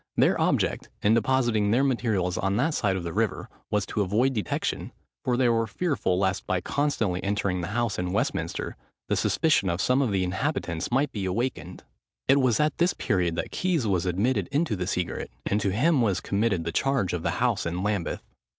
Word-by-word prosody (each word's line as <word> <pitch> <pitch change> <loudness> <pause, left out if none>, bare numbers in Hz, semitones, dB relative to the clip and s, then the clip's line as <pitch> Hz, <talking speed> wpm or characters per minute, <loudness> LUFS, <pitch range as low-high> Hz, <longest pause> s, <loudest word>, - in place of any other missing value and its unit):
Their - - +3
object, - - 0
in 105 - +5
depositing 115 -3 +2
their 120 +6 +3
materials 110 -9 0
on 95 +1 0
that 150 +6 +1
side 100 -8 +1
of 95 - -3
the 85 -1 -4
river, - - -1 0.2
was 105 -1 0
to 105 - -2
avoid 110 +8 +2
detection, 105 -4 -2 0.3
for 125 -1 +1
they 130 -1 +3
were 115 -1 +2
fearful 140 - 0
lest, 95 -1 0
by 95 - +1
constantly 115 -10 -1
entering 100 -2 0
the 85 - -3
house 115 -1 -1
in 90 0 -2
Westminster, 100 - -2 0.3
the - - +2
suspicion - - +2
of 85 +1 -1
some 125 +6 +2
of 130 - +1
the 95 -2 +1
inhabitants 90 - -2
might 135 +3 +1
be 100 -3 -3
awakened. 90 -4 -3 0.4
It 135 +1 +5
was 125 -4 +2
at 150 -1 +1
this 175 +1 +2
period 90 -5 0
that - - -3
Keys 175 -9 0
was 95 -3 +1
admitted 100 +3 +1
into 145 -5 +1
the 90 -2 -3
secret, 90 -3 -2 0.2
and 105 +1 +1
to 100 - +1
him 135 - +2
was 100 -6 +1
committed 100 -4 0
the 85 - -3
charge 130 -1 0
of 90 - -2
the - - -1
house - - +1
in 90 +2 -3
Lambeth. 100 -4 -2
105 Hz, 200 wpm, -26 LUFS, 90-130 Hz, 0.4 s, in